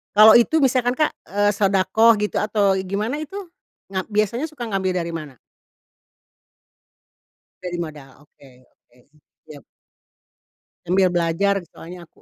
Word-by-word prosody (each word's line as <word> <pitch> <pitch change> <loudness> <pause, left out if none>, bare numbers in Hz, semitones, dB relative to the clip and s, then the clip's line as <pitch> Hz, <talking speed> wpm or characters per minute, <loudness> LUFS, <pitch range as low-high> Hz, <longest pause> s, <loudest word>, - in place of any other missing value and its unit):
Kalau 215 +1 +9
itu 315 +5 +2
misalkan, 255 -1 +1
Kak, 305 - +1 0.2
eee, 205 +1 +1
shodaqoh 200 +3 +3
gitu 210 0 -2
atau 210 -2 +1 0.2
gimana 215 +9 -3
itu, 310 +5 -8 0.6
ngap 190 -1 -3
biasanya 215 +7 -1
suka 300 -6 -9
ngambil 190 -2 -1
dari 170 -1 -3
mana? 155 -5 -8 2.3
Dari 175 -1 -5
modal, 150 -5 -7
oke 140 -1 -21 0.2
oke. 120 - -32 0.5
Siap. 145 -4 -13 1.2
Sambil 185 +1 +2
belajar 175 +3 0
soalnya 175 +2 -12
aku. - - -29
195 Hz, 125 wpm, -21 LUFS, 175-220 Hz, 2.3 s, Kalau